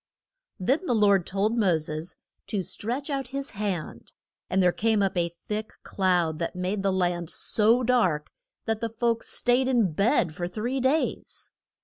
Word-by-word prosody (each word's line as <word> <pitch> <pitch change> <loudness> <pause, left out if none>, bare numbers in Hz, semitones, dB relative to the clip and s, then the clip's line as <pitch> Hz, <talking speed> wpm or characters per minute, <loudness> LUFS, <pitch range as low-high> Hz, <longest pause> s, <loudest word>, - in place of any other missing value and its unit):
Then 275 - 0
the 245 - +2
Lord 200 -4 +3
told 200 +4 0
Mo 195 -8 +3
ses 155 +2 -4 0.3
to 200 -3 -2
stretch 250 - -3
out 270 -2 -2
his 275 +2 -4
hand, 195 -6 -4 0.4
and 190 0 +2
there 180 - +5
came 220 +1 +1
up 195 - 0
a 170 -1 +1
thick 210 +5 -6
cloud 175 -5 0
that 170 - -3
made 185 +3 -2
the 195 0 +1
land 175 -3 -1
so 230 +7 +4
dark 185 -12 +1 0.3
that 225 -1 -1
the 230 - -1
folks 230 +1 -1
staid 250 +1 +1
in 235 -8 +2
bed 195 - +2
for 175 +2 -3
three 235 +9 -3
days. 270 +5 -1
205 Hz, 165 wpm, -26 LUFS, 180-240 Hz, 0.4 s, there